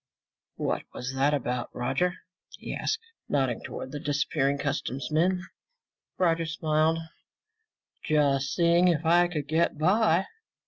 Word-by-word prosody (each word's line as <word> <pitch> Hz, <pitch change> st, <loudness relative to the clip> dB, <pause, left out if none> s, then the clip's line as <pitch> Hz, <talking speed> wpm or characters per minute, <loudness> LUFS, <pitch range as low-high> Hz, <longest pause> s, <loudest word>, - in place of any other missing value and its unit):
"What -, -, -1 dB
was 125 Hz, +2 st, -4 dB
that 135 Hz, +2 st, +2 dB
about, 125 Hz, -4 st, -2 dB
Roger?" 135 Hz, +9 st, 0 dB, 0.4 s
he -, -, -6 dB
asked, 440 Hz, -, -1 dB, 0.3 s
nodding 130 Hz, -5 st, 0 dB
toward 130 Hz, -, -7 dB
the 145 Hz, -, -5 dB
disappearing 140 Hz, -1 st, 0 dB
customs 140 Hz, -2 st, -3 dB
men. 180 Hz, +4 st, +2 dB, 0.7 s
Roger 165 Hz, -2 st, +2 dB
smiled. 160 Hz, 0 st, +1 dB, 1.1 s
"Just 140 Hz, -2 st, +2 dB
seeing 170 Hz, +1 st, +4 dB
if 165 Hz, -2 st, +1 dB
I 175 Hz, +2 st, +5 dB
could 150 Hz, -5 st, -4 dB
get 160 Hz, +1 st, +1 dB
by." 185 Hz, +2 st, +3 dB
155 Hz, 125 wpm, -27 LUFS, 140-170 Hz, 1.1 s, I